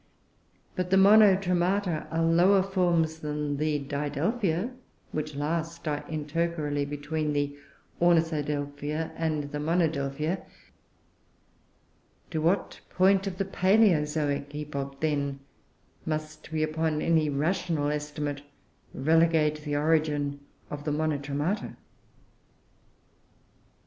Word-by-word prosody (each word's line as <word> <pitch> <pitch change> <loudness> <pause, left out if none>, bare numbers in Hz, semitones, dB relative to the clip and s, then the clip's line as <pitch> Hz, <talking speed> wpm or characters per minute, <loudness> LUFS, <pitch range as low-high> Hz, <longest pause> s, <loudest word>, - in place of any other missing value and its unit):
But 180 -1 -2
the 190 - +4
Monotremata 190 -3 +4
are 165 0 0
lower 180 +4 +5
forms 175 -4 +1
than 150 -1 -3
the 150 0 +1
Didelphia 160 - -1 0.4
which 155 -1 -4
last 165 +3 -3
are 145 -1 -1
intercalary 155 -1 -1
between 150 +1 -2
the 145 0 -1 0.5
Ornithodelphia 150 -2 0
and 155 -3 -2
the 150 - -3
Monodelphia. 155 0 0 1.9
To 160 -2 -1
what 175 +5 0
point 190 +1 +3
of 185 -2 -4
the 195 - -1
Palaeozoic 155 -8 +2
epoch, 140 -2 -5
then, 140 -3 -1 0.7
must 155 0 -4
we, 155 -1 0
upon 155 0 -1
any 160 -2 +3
rational 155 +1 0
estimate, 150 -1 -3 0.5
relegate 155 +1 +3
the 145 -1 -2
origin 150 -2 +1 0.3
of 145 0 -5
the 150 - -2
_Monotremata? 150 +4 -1
155 Hz, 100 wpm, -28 LUFS, 145-170 Hz, 1.9 s, lower